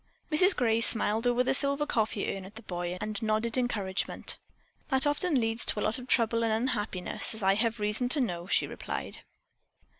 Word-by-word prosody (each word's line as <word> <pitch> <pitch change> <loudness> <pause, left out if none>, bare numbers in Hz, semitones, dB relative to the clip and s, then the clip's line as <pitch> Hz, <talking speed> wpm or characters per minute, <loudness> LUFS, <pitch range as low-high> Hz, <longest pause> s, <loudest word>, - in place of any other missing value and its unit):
Mrs 365 +5 +6
Gray 230 -2 +1
smiled 225 0 +3
over 245 +1 +2
the - - +1
silver 280 +2 +1
coffee 220 -6 -1
urn 195 - -7
at 195 +3 -13
the 225 - -11
boy 175 -1 -4
and 210 0 -4
nodded 220 +1 -1
encouragement. 210 -7 -1 0.5
"That 265 -1 +4
often 290 0 +1
leads 225 0 0
to - - +2
a - - -1
lot 215 +4 0
of 250 - -10
trouble 230 -1 +1
and 225 - +1
unhappiness, 220 -4 -1
as 220 - -6
I 195 0 +4
have 225 +2 +1
reason 210 +4 -1
to 290 - +2
know," 175 -8 -2
she - - +2
replied. - - -5
225 Hz, 190 wpm, -28 LUFS, 210-250 Hz, 0.5 s, Mrs